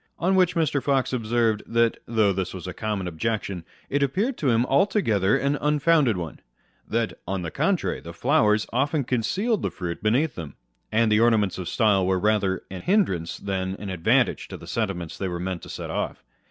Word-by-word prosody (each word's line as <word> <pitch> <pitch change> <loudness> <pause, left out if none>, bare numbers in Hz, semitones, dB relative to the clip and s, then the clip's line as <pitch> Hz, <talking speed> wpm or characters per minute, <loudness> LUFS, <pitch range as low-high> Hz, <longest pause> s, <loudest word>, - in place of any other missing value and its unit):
On 185 +3 +1
which 180 -1 +3
Mr. 155 -4 +1
Fox 135 -2 +1
observed, 115 -2 +1
that 115 0 +2
though 110 -4 +2
this 95 0 -3
was 90 - -7
a 90 - -5
common 105 -2 -3
objection, 95 +1 -3 0.2
it 145 - 0
appeared 200 - 0
to 140 - +1
him 115 +1 +3
altogether 135 - +2
an 140 +2 0
un 150 +1 +1
founded 145 - +3
one; 85 -3 -6 0.5
that 115 -1 -1
on 95 -1 -2
the 80 - -4
contrary, - - 0
the - - -9
flowers 105 0 +2
often 140 +4 +1
con 125 0 0
cealed 205 - 0
the - - -1
fruit 85 -2 -5
beneath 125 +7 +2
them, 80 -5 -8 0.4
and 110 0 +3
the 105 - +4
ornaments 110 -5 +3
of 90 - -4
style 105 -5 +3
were 95 0 +2
rather 100 -2 +1
an 95 -2 -6
hindrance 130 - +1
than 95 -1 -3
an 100 -1 -6
advantage 90 -3 +1
to - - -8
the - - -12
senti 110 -5 -1
ments 85 -2 -7
they 95 - -1
were 85 -1 -4
meant 90 -1 -3
to - - -11
set - - -6
off. - - -3
110 Hz, 205 wpm, -25 LUFS, 95-140 Hz, 0.5 s, the